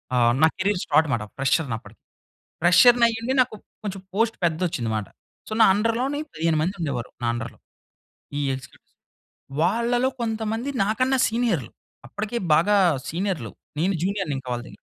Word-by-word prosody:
ఆహ్, 120 -1 +4
నా 160 - +8
career 190 -1 0
start 155 +1 +3
మాట. 110 -2 -1
ఫ్రెషర్‌ని 135 -2 +1
అప్పటికి, - - -16 0.6
ప్రెషర్‌ని 235 +7 +6
అయ్యుండి, 230 +3 -2
నాకు 245 - -5 0.3
కొంచెం 195 -2 -4
పోస్ట్ 225 +2 +1
పెద్దది 170 +2 +1
ఒచ్చింది 115 -7 -3
మాట. 105 - -3 0.4
సో, - - -7
నా 220 - +9
అండర్‌లోని 240 +7 0
15 160 0 0
మంది 185 +5 -1
ఉండేవారు, 130 -6 -3
నా - - +1
అండర్‌లో. 120 - -6 0.8
ఈ - - 0
ఎగ్జిక్యూటివ్స్, 130 0 -11 0.7
వాళ్ళలో 235 +7 +2
కొంతమంది, 225 +2 -2 0.2
నాకన్నా 255 +5 +1
సీనియర్లు. 225 - -1 0.4
అప్పటికే 215 - -3 0.2
బాగా 205 +6 +4 0.3
సీనియర్లు. 170 - -3 0.3
నేను 190 +3 +1
జూనియర్‌నింకా 155 -10 -2
వాళ్ళ 120 0 -3
దగ్గర. - - -16
195 Hz, 145 wpm, -24 LUFS, 150-230 Hz, 0.8 s, నా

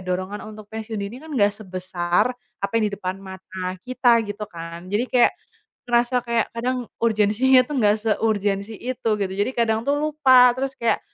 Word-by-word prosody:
dorongan 185 +3 -3
untuk 215 -1 -11
pensiun 220 0 -5
dini 200 +4 -5
kan 320 - -9
nggak 205 -7 +4
sebesar 185 -2 -1 0.3
apa 200 - -2
yang 225 - +2
di - - -11
depan 185 -1 -4
mata 190 -1 -6
kita, 245 -2 +3
gitu 205 +1 -4
kan. 170 +1 -9
Jadi 215 +4 +2
kayak 245 -1 +4 0.6
ngerasa 240 +1 +2
kayak 235 -1 +1
kadang 250 +1 -2 0.2
urgensinya 225 +4 +4
tuh 295 - -4
nggak 210 -2 +4
seurgensi 210 -1 0
itu, 245 -2 -3
gitu. 190 -2 -2
Jadi 205 +6 0
kadang 225 -1 +1
tuh 285 - +3
lupa 265 -5 +5
terus 270 +1 -2
kayak 235 - +2
215 Hz, 170 wpm, -23 LUFS, 195-245 Hz, 0.6 s, lupa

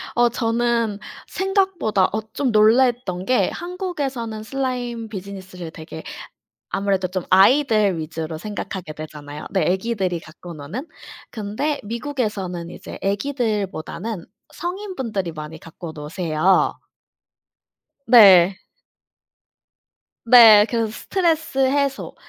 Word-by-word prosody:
어 240 0 +4
저는 230 -2 0 0.3
생각보다 380 - +1
어 220 - -1
좀 265 -4 0
놀랐던 220 -3 +3
게 255 - +2
한국에서는 285 - -4
슬라임 245 -2 -3
비즈니스를 190 -4 -8
되게 160 0 -9 0.7
아무래도 195 -2 0
좀 185 -1 -4
아이들 210 - +4
위주로 160 0 -5
생각하게 190 -4 -6
되잖아요. 150 -1 -9
네. 190 - +1
애기들이 190 -2 -1
갖고 170 +2 -11
노는. 165 - -7 0.4
근데 220 +8 -3
미국에서는 210 - -3
이제 - - -9
아기들보다는 205 - -2 0.3
성인 375 +2 -5
분들이 200 -9 -3
많이 155 +1 -8
갖고 165 0 -9
노세요. 160 +3 +1 1.3
네. 195 -5 +7 1.7
네. 225 -3 +9
그래서 230 -2 0
스트레스 320 - -1
해소 270 +1 0
215 Hz, 255 characters per minute, -21 LUFS, 180-250 Hz, 1.7 s, 네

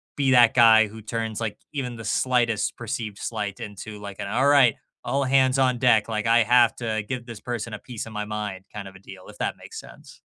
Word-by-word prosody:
be 135 -2 +1
that 120 -2 +6
guy 115 -3 +6
who 110 +2 -11
turns, 110 0 -4
like, 110 -2 -3 0.2
even 125 -4 -4
the 115 -1 -9
slightest 120 -1 0
perceived 110 -3 -5
slight 105 -2 -4
into 105 -2 -8
an 105 - -12
like 100 -1 -9
“all 110 +7 0
right, 140 -5 +5 0.3
all 135 +3 0
hands 130 0 +3
on 130 -2 +2
deck, 115 -4 +3
like 110 -1 -2
I 115 0 +5
have 120 0 +4
to 110 -3 -2
give 125 -2 -4
this 115 -3 -10
person 120 -2 -5
a 105 - -6
piece 120 -2 -7
of 115 - -10
my 105 0 -3
mind” 105 -3 -5
kind 100 -2 -7
of 95 - -13
a 95 - -13
deal, 95 -1 -13
if - - -13
that - - -2
makes - - -9
sense. - - -14
115 Hz, 230 wpm, -24 LUFS, 105-125 Hz, 0.3 s, that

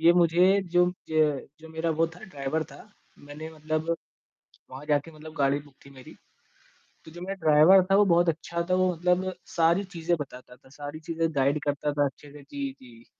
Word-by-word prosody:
ये 170 +1 +6
मुझे 180 +3 +4
जो 175 0 +5 0.2
ज 155 -4 +1
जो 160 - -12
मेरा 160 +1 -2
वो 165 - +4
था, 165 +2 -13
ड्राइवर 155 -3 -3
था। - - -12 0.4
मैंने 145 +2 -9
मतलब 155 +1 -2 0.8
वहाँ 135 +3 -9
जाके 150 +2 0
मतलब 155 0 -11
गाड़ी 140 0 +2
बुक 145 -1 -16
थी 140 - -13
मेरी। 130 -2 -14 0.9
तो 160 - -12
जो 175 +2 -10
मेरा 195 +2 -4
ड्राइवर 155 +6 +7
था, 195 - +6
वो 205 - +6
बहुत 175 -2 +4
अच्छा 170 +2 -3
था 185 - +3
वो 185 0 +3
मतलब 180 +2 +1 0.2
सारी 170 +3 +3
चीज़ें 175 -2 -1
बताता 125 -3 -9
था, 130 - -22
सारी 145 +2 -8
चीज़ें 165 +1 -1
गाइड 140 +2 +2
करता 145 0 -1
था 145 0 +2
अच्छे 140 +1 -7
से 145 - -12
जी, 280 - -5
जी। 120 -2 -16
160 Hz, 195 wpm, -27 LUFS, 145-175 Hz, 0.9 s, ड्राइवर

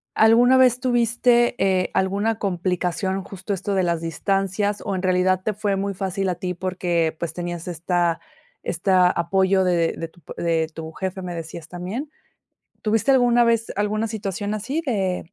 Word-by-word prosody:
¿alguna 240 +4 +6
vez 250 -1 +5
tuviste, 240 -1 +2
eh, 185 -1 +1
alguna 200 +4 0
complicación, 190 0 -1
justo 195 +1 -5
esto 195 +1 -3
de 190 - +2
las 170 -2 0
distancias, 195 +4 -1
o 195 - -2
en 185 - -2
realidad 185 0 +2
te 215 - -1
fue 205 -1 -1
muy 200 0 -2
fácil 190 +1 -2
a 180 - 0
ti 180 +1 -4
porque, 175 -3 -1
pues, 170 - -3
tenías 175 -1 -5
esta 175 0 0 0.4
esta 180 +1 +3
apoyo 190 +2 +2
de 170 -2 +2
de 165 - -4
tu 175 - -23
pa - - -10
de 165 -2 0
tu 160 0 -7
jefe?, 190 +1 -4
me 180 -1 -5
decías 165 -1 -7
también. 195 - -5 0.7
¿Tuviste 225 +5 +1
alguna 245 -2 +5
vez 230 -1 +1
alguna 210 +2 0
situación 205 -1 -4
así 270 +10 -2
de 190 - -2
190 Hz, 170 wpm, -23 LUFS, 175-215 Hz, 0.7 s, alguna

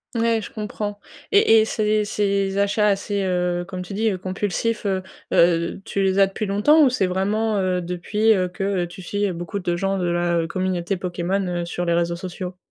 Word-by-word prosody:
Ouais, 230 -1 +2
je - - -7
comprends 210 -1 -5 0.3
Et 225 - +6
et 220 - +3
ces 215 -1 +1
ces 200 -1 0
ces 195 - -4
achats 205 +1 +2
assez, 200 0 0
heu, 180 -1 0
comme 185 -1 -5
tu 180 +2 -7
dis, 220 +2 +1
heu, 190 - -2
compulsifs, 205 +4 -2
heu, 190 -1 0 0.3
heu, 170 +2 +3
tu 200 - -2
les 190 0 +2
as 195 - +6
depuis 205 +3 -4
longtemps? 255 +11 +4
Ou - - +5
c'est 200 -7 +1
vraiment, 205 +4 0
heu, 185 -1 0
depuis, 180 +6 0
heu, 185 -3 +1
que, 180 +2 -6
heu, 190 -3 0
tu 180 +2 -11
suis, 205 +3 -2
heu, 185 - -2
beaucoup 175 +4 -5
de 175 -2 -1
gens 195 +2 -1
de 180 - -1
la, 175 0 +1
heu, 165 - -1
communauté 185 +1 -1
Pokémon, 180 +2 -2
heu, 175 -1 -2
sur 175 +1 -3
les 170 -1 +1
réseaux 170 0 +1
sociaux? 180 0 -6
195 Hz, 220 wpm, -22 LUFS, 180-205 Hz, 0.3 s, Et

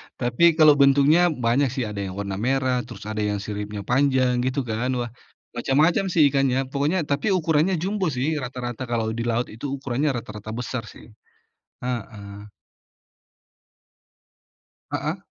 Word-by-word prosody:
Tapi, 130 +7 +3
kalau 155 -2 +7
bentuknya, 140 +5 +5
banyak, 135 -3 +1
sih. 130 0 -3
Ada 105 -3 -4
yang 95 - -7
warna 100 -1 -4
merah, 130 +1 +1
terus - - -10
ada 110 +1 -4
yang 105 -1 0
siripnya 105 -1 -5
panjang, 130 0 +2
gitu, 130 +2 -1
kan. 115 +1 -2
Wah, 120 -2 -3 0.4
macam-macam, 150 +10 +2
sih, 170 -4 +3
ikannya. 135 -1 +1
Pokoknya 150 +6 0
tapi 145 +7 0
ukurannya 165 +1 +2
jumbo, 195 -1 -1
sih, 150 +2 -1
rata-rata, 125 -1 -5
kalau 115 -2 -1
di 115 +1 -3
laut 120 +1 -1
itu 115 +6 -8
ukurannya 135 +1 -1
rata-rata 110 -1 -7
besar, 125 -1 -4
sih. 115 - -14 0.7
Heeh. 105 -4 -6 2.5
Heeh? - - -3
125 Hz, 140 wpm, -24 LUFS, 115-145 Hz, 2.5 s, kalau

